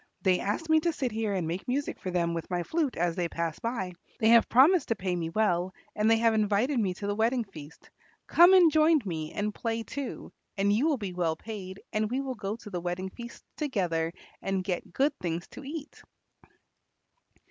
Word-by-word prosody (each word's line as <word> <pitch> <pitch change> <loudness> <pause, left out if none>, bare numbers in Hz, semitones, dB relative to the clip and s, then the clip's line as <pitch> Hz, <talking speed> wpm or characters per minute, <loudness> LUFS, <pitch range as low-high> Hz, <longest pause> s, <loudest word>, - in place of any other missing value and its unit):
They 185 -2 +3
asked 210 +11 -2
me 315 0 +5
to 335 +2 +1
sit 260 -5 -2
here 215 -2 -1
and 175 -4 -1
make 175 +4 -4
music 275 +3 -2
for 185 - -4
them 170 -2 0
with 165 -1 -4
my 175 -1 -1
flute 310 - -1
as 170 -1 0
they 175 -2 -1
pass 165 -2 -3
by. 225 -6 -3 0.3
They 220 - +4
have 230 0 +6
promised 305 +9 +5
to 230 - +1
pay 185 -3 -2
me 165 -2 -2
well, 185 -1 0 0.2
and 210 +1 +2
they 225 - +5
have 230 0 +3
invited 215 +5 +2
me 190 -4 0
to 200 - -6
the 205 - 0
wedding 230 +3 +1
feast. 165 -6 -13 0.4
Come 350 +3 +7
and 350 -4 +7
join 310 0 +4
me 160 -4 -4
and 210 0 -2
play 230 +1 -2
too, 280 +2 -6 0.3
and 200 +1 +3
you 245 +9 +2
will 300 -4 +2
be 200 -5 -5
well 170 -3 0
paid, 195 -1 -8
and 215 0 0
we 255 +3 -1
will 270 -1 -3
go 205 -3 -4
to 220 -3 -11
the 175 -2 -3
wedding 180 +2 -3
feast 235 +2 -10
together 180 - -1 0.3
and 195 -1 -1
get 180 -2 -3
good 280 +2 +2
things 170 0 -3
to - - -10
eat." 295 +2 -7
210 Hz, 210 wpm, -29 LUFS, 180-255 Hz, 0.4 s, Come